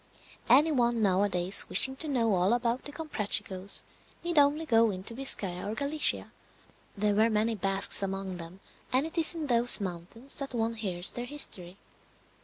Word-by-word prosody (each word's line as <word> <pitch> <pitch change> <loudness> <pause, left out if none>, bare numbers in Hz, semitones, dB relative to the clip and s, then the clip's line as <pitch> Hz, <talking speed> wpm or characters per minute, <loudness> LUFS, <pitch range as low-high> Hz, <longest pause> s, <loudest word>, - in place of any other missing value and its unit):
Any 290 +7 +4
one 240 -4 0
nowadays 190 -1 +1
wishing 265 0 +8
to 315 - -1
know 235 -7 0
all 185 +4 +1
about 240 +1 -2
the 290 - -5
Comprachicos 205 - 0 0.4
need 345 -3 +1
only 290 +3 +1
go 230 -4 +2
into 195 +3 -6
Biscaya 200 -8 -1
or 215 - -5
Galicia; 285 +3 +1 0.7
there 205 +1 0
were 220 +3 +2
many 220 +1 -1
Basques 195 -1 0
among 195 -1 -5
them, 175 +3 -11 0.3
and 260 +3 +1
it 320 - -7
is 330 +1 -2
in 320 -2 -5
those 240 -3 +2
mountains 195 +7 -3
that 275 -3 -6
one 230 0 -2
hears 190 -5 -2
their 245 - -6
history. 195 -10 -5
225 Hz, 165 wpm, -28 LUFS, 195-270 Hz, 0.7 s, wishing